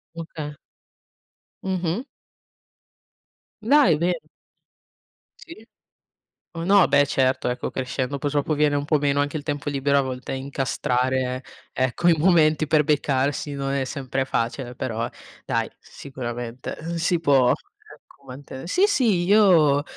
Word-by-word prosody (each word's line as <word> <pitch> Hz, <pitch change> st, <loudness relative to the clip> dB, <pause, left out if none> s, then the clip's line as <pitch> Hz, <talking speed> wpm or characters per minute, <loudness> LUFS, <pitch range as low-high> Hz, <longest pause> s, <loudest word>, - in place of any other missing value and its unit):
Okay. 155 Hz, -3 st, -7 dB, 1.1 s
Mh-mh. 185 Hz, +4 st, -2 dB, 1.6 s
Dai, 225 Hz, -, +5 dB
bene. 175 Hz, 0 st, 0 dB, 1.3 s
Sì. 330 Hz, -10 st, -12 dB, 0.9 s
Oh, 165 Hz, -1 st, -5 dB
no, 195 Hz, 0 st, +5 dB
beh 145 Hz, 0 st, +4 dB
certo, 130 Hz, -2 st, +1 dB
ecco, 125 Hz, 0 st, -3 dB
crescendo, 130 Hz, +1 st, -3 dB
poi 145 Hz, -, -2 dB
dopo 145 Hz, +2 st, 0 dB
viene 150 Hz, -1 st, +2 dB
un 145 Hz, -, -1 dB
po' 150 Hz, +1 st, +2 dB
meno 140 Hz, 0 st, +1 dB
anche 145 Hz, +2 st, -1 dB
il 145 Hz, -, -8 dB
tempo 145 Hz, -1 st, -4 dB
libero 140 Hz, 0 st, +1 dB
a -, -, +4 dB
volte 130 Hz, -1 st, -5 dB
incastrare 130 Hz, -1 st, -1 dB, 0.3 s
ecco 130 Hz, +7 st, 0 dB
i 170 Hz, -, +6 dB
momenti 155 Hz, -2 st, +3 dB
per 150 Hz, 0 st, +3 dB
beccarsi 145 Hz, -1 st, 0 dB
non 135 Hz, -1 st, -3 dB
è 140 Hz, -1 st, 0 dB
sempre 135 Hz, -1 st, -3 dB
facile, 125 Hz, 0 st, -2 dB
però 115 Hz, -1 st, -3 dB, 0.4 s
dai -, -, -1 dB
sicuramente, 120 Hz, -2 st, -7 dB
uhm, 170 Hz, +2 st, -4 dB
si 165 Hz, +1 st, +1 dB
può 135 Hz, -5 st, +4 dB
ecco 140 Hz, -, -8 dB
manten 130 Hz, +2 st, -9 dB
Sì 360 Hz, -, +2 dB
sì, 230 Hz, -, +2 dB
io, 175 Hz, -8 st, +5 dB
145 Hz, 130 wpm, -23 LUFS, 130-165 Hz, 1.6 s, i